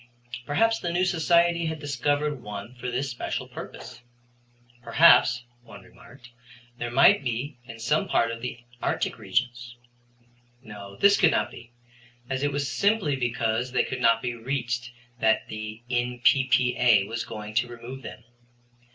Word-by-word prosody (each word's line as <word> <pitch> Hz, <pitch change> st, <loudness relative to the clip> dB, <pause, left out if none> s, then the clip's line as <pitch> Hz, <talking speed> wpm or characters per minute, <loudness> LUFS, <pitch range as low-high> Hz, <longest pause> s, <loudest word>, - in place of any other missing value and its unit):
Perhaps 225 Hz, +10 st, +2 dB
the 175 Hz, -, -3 dB
new 180 Hz, +2 st, +1 dB
Society 170 Hz, -1 st, +2 dB
had 160 Hz, 0 st, -3 dB
discovered 145 Hz, 0 st, -1 dB
one 105 Hz, +2 st, -8 dB
for 125 Hz, 0 st, -6 dB
this 130 Hz, +2 st, -2 dB
special 120 Hz, -, -4 dB
purpose. -, -, -10 dB, 0.8 s
Perhaps, 125 Hz, 0 st, +5 dB, 0.2 s
one 100 Hz, -5 st, -14 dB
remarked, 120 Hz, +5 st, -17 dB, 0.5 s
they 120 Hz, -, -3 dB
might 135 Hz, +2 st, +5 dB
be 125 Hz, +2 st, -4 dB
in 115 Hz, -1 st, -10 dB
some 150 Hz, -, 0 dB
part 115 Hz, -8 st, +1 dB
of 115 Hz, 0 st, -7 dB
the 120 Hz, -1 st, -6 dB, 0.2 s
arctic -, -, -2 dB
regions. 125 Hz, -1 st, -2 dB, 0.9 s
No, 100 Hz, -3 st, -10 dB
this 200 Hz, -, +5 dB
could 175 Hz, -, +5 dB
not -, -, 0 dB
be, 120 Hz, -, -13 dB, 0.6 s
as 130 Hz, 0 st, -1 dB
it 145 Hz, 0 st, 0 dB
was 140 Hz, 0 st, -2 dB
simply 185 Hz, -, +1 dB
because 120 Hz, -1 st, -1 dB
they -, -, +3 dB
could -, -, -5 dB
not 115 Hz, 0 st, +3 dB
be 125 Hz, -1 st, -2 dB
reached 120 Hz, 0 st, -3 dB, 0.3 s
that 110 Hz, -1 st, +2 dB
the 110 Hz, +1 st, -7 dB
N.P.P.A. 125 Hz, -2 st, +3 dB
was 115 Hz, +2 st, -4 dB
going 105 Hz, -1 st, -8 dB
to 120 Hz, +2 st, +1 dB
remove 120 Hz, +2 st, -9 dB
them. 115 Hz, -1 st, -10 dB
125 Hz, 150 wpm, -26 LUFS, 115-145 Hz, 0.9 s, Perhaps